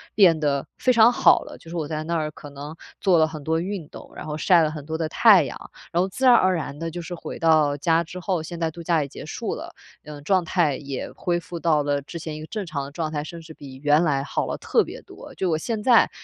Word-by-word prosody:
变 180 Hz, -6 st, +6 dB
得 145 Hz, 0 st, 0 dB
非 255 Hz, -, +2 dB
常 235 Hz, 0 st, +6 dB
好 -, -, +5 dB
了。 -, -, -10 dB
就 165 Hz, -, -15 dB
是 170 Hz, -, -5 dB
我 155 Hz, -3 st, -2 dB
在 155 Hz, 0 st, -3 dB
那 170 Hz, +1 st, -2 dB
儿 155 Hz, -1 st, -1 dB
可 145 Hz, -, -11 dB
能 145 Hz, +2 st, -9 dB, 0.2 s
做 185 Hz, -4 st, +3 dB
了 160 Hz, -, +5 dB
很 155 Hz, -1 st, -8 dB
多 160 Hz, +1 st, 0 dB
运 185 Hz, -4 st, -4 dB
动， -, -, -12 dB
然 -, -, -8 dB
后， 150 Hz, 0 st, -4 dB
晒 175 Hz, +1 st, +4 dB
了 155 Hz, -, +1 dB
很 150 Hz, -2 st, -8 dB
多 160 Hz, +1 st, -3 dB
的 160 Hz, -1 st, -1 dB
太 200 Hz, -6 st, +6 dB
阳， -, -, -8 dB, 0.2 s
然 175 Hz, -, +2 dB
后， 185 Hz, -, +1 dB
自 265 Hz, +7 st, -2 dB
然 250 Hz, -, +8 dB
而 185 Hz, -1 st, +4 dB
然 145 Hz, -3 st, -4 dB
地， 165 Hz, 0 st, -3 dB
就 175 Hz, +1 st, -5 dB
是， 175 Hz, -, -7 dB
回 -, -, -7 dB
到 155 Hz, -3 st, +3 dB
家 165 Hz, +3 st, +2 dB
之 175 Hz, +3 st, -9 dB
后， 180 Hz, -2 st, -1 dB
现 170 Hz, +1 st, -7 dB
在 165 Hz, -, 0 dB
度 170 Hz, -, -10 dB
假 165 Hz, -2 st, +2 dB
也 -, -, -6 dB
结 -, -, -10 dB
束 -, -, -4 dB
了， -, -, -8 dB, 0.3 s
呃， 150 Hz, -1 st, -9 dB
状 185 Hz, +2 st, +2 dB
态 160 Hz, -4 st, +1 dB
也 135 Hz, -1 st, -6 dB
恢 175 Hz, -1 st, -1 dB
复 170 Hz, 0 st, -8 dB
到 155 Hz, -3 st, +2 dB
了 145 Hz, 0 st, 0 dB
之 155 Hz, +4 st, -9 dB
前 160 Hz, -1 st, -6 dB
一 155 Hz, -, -7 dB
个 155 Hz, -, -8 dB
正 210 Hz, 0 st, -4 dB
常 145 Hz, -4 st, -4 dB
的 140 Hz, -, -10 dB
状 155 Hz, 0 st, -3 dB
态， 150 Hz, -1 st, -2 dB
甚 170 Hz, +1 st, -9 dB
至 160 Hz, 0 st, -12 dB
比 140 Hz, -3 st, -11 dB
原 150 Hz, +3 st, +4 dB
来 140 Hz, -4 st, +1 dB
好 -, -, -2 dB
了 -, -, -3 dB
特 -, -, +2 dB
别 -, -, -9 dB
多。 -, -, -12 dB
就 185 Hz, -, -1 dB
我 -, -, +2 dB
现 215 Hz, +6 st, -3 dB
在 240 Hz, -3 st, +5 dB
160 Hz, 305 characters per minute, -24 LUFS, 150-175 Hz, 0.3 s, 然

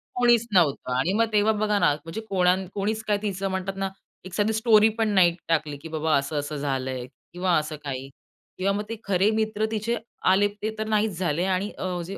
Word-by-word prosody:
कोणीच 240 Hz, -2 st, +4 dB
नव्हतं. 150 Hz, -8 st, +2 dB
आणि 175 Hz, +8 st, +1 dB
मग 230 Hz, +2 st, +3 dB
तेव्हा 210 Hz, +1 st, +4 dB
बघा 210 Hz, -1 st, +1 dB
ना 150 Hz, -5 st, +4 dB
म्हणजे 165 Hz, +9 st, -7 dB
कोणा 180 Hz, -2 st, +3 dB, 0.2 s
कोणीच 215 Hz, +2 st, -2 dB
काय 210 Hz, -1 st, +2 dB
तिचं 195 Hz, -2 st, -2 dB
म्हणतात 190 Hz, +1 st, -3 dB
ना, 195 Hz, 0 st, -1 dB, 0.4 s
एक 185 Hz, -, -9 dB
साधी 210 Hz, +4 st, +1 dB
स्टोरीपण 220 Hz, 0 st, +4 dB
नाही 175 Hz, -2 st, +5 dB
टाकली 155 Hz, -3 st, 0 dB
की 145 Hz, -, -10 dB
बाबा 155 Hz, 0 st, +1 dB
असं 140 Hz, +2 st, -3 dB
असं 145 Hz, +1 st, -4 dB
झालंय 130 Hz, -3 st, -2 dB, 0.3 s
किंवा 180 Hz, 0 st, 0 dB
असं 155 Hz, 0 st, -2 dB
काही. 135 Hz, -1 st, -5 dB, 0.5 s
किंवा 195 Hz, +2 st, +1 dB
मग 205 Hz, +1 st, -2 dB
ते 230 Hz, -, -3 dB
खरे 195 Hz, +1 st, +2 dB
मित्र 220 Hz, 0 st, 0 dB
तिथे 225 Hz, +2 st, -1 dB, 0.4 s
आले, 200 Hz, +2 st, +4 dB
ते 205 Hz, +1 st, -5 dB
तर 220 Hz, 0 st, -3 dB
नाहीच 215 Hz, -3 st, +1 dB
झाले 170 Hz, -1 st, 0 dB
आणि 190 Hz, +2 st, 0 dB
अ, 180 Hz, -1 st, -3 dB
जे 195 Hz, +3 st, -6 dB
190 Hz, 200 wpm, -25 LUFS, 160-215 Hz, 0.5 s, नाही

